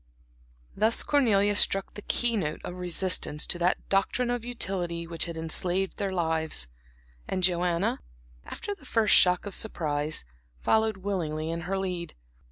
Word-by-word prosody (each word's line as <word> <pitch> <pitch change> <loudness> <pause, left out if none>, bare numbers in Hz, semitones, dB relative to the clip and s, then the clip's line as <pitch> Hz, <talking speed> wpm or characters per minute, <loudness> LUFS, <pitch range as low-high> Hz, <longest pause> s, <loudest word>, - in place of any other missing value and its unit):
Thus 220 +3 +3
Cornelia 205 -8 +3
struck 195 -1 +2
the 210 - -8
key 240 +2 0
note 155 -7 -2
of - - -5
resistance 180 -3 0
to 175 - -1
that 175 +1 0
doctrine 240 +5 +1
of 245 -2 -2
utility 185 -8 -2
which 165 0 0
had 170 -1 -6
enslaved 180 +4 -1
their 200 -2 -2
lives, 160 - +1 0.6
and 185 - -2
Joanna, 175 0 +1 0.4
after 410 - -6
the 335 - -16
first 225 -5 +2
shock 180 +1 +5
of 205 - -5
surprise, 155 - 0 0.3
followed 220 - +2
willingly 165 -5 -3
in 170 0 -3
her 195 - 0
lead. 180 -3 -4
185 Hz, 150 wpm, -27 LUFS, 170-205 Hz, 0.6 s, shock